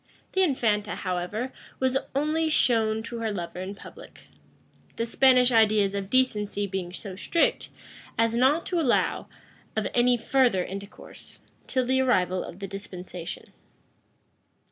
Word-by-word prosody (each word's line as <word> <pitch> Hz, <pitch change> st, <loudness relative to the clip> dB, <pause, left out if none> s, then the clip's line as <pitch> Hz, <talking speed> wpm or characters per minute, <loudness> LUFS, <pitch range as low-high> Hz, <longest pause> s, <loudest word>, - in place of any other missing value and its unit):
The 380 Hz, -, +1 dB
infanta, 220 Hz, -, +1 dB
however, 185 Hz, +7 st, -3 dB, 0.3 s
was 260 Hz, 0 st, +1 dB, 0.2 s
only 310 Hz, +3 st, +1 dB
shown 220 Hz, -6 st, +2 dB
to 235 Hz, +1 st, -6 dB
her 225 Hz, -1 st, -1 dB
lover 180 Hz, -2 st, -5 dB
in 190 Hz, +2 st, -5 dB
public; -, -, -13 dB, 0.7 s
the 230 Hz, -, -1 dB
Spanish 255 Hz, +1 st, +4 dB
ideas 215 Hz, -3 st, +4 dB
of 200 Hz, -1 st, -4 dB
decency 210 Hz, -5 st, +1 dB
being 190 Hz, -2 st, -4 dB
so 190 Hz, +1 st, -8 dB
strict, 330 Hz, -, 0 dB, 0.5 s
as 230 Hz, 0 st, +2 dB
not 265 Hz, +8 st, +3 dB
to 355 Hz, -, -1 dB
allow 265 Hz, -7 st, +1 dB, 0.5 s
of 215 Hz, -1 st, 0 dB
any 245 Hz, 0 st, +4 dB
further 240 Hz, -6 st, +2 dB
intercourse, 200 Hz, +2 st, -10 dB, 0.3 s
till 255 Hz, -1 st, 0 dB
the 260 Hz, +1 st, +2 dB
arrival 185 Hz, -8 st, +2 dB
of 170 Hz, -, -9 dB
the 195 Hz, 0 st, -6 dB
dispensation. 185 Hz, -3 st, -7 dB
220 Hz, 135 wpm, -26 LUFS, 195-255 Hz, 0.7 s, Spanish